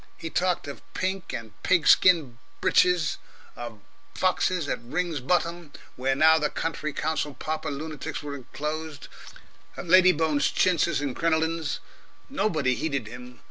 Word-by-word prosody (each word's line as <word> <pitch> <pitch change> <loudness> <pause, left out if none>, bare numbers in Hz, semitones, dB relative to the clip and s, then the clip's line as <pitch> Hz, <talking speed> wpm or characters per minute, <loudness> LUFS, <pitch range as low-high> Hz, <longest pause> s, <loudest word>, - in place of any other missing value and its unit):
He 165 - -6
talked 180 -4 0
of 140 - -8
pink 190 -1 -2
and 115 -2 -6
pig 175 -4 +2
skin 155 -10 +5 0.2
breeches, 180 -4 +3 0.4
of 115 -3 -8 0.3
foxes 185 -3 +1
at - - -2
Ring's 160 +5 -2
Bottom, 170 +2 -1 0.2
where 130 +1 0
now 160 +3 +6
the 150 -1 0
County 155 -2 -3
Council 150 -1 -2
pauper 155 +3 -3
lunatics 150 0 -5
were 145 -1 -5
enclosed, 150 +3 -6 0.7
of - - -6
Lady 185 +1 +7
Bone's 155 -3 +1
chintzes 170 -3 +2
and 140 -4 -3
crinolines. 160 -1 0 0.5
Nobody 160 - +1
heeded 140 -3 -2
him. 125 +2 -10
155 Hz, 140 wpm, -26 LUFS, 140-170 Hz, 0.7 s, Lady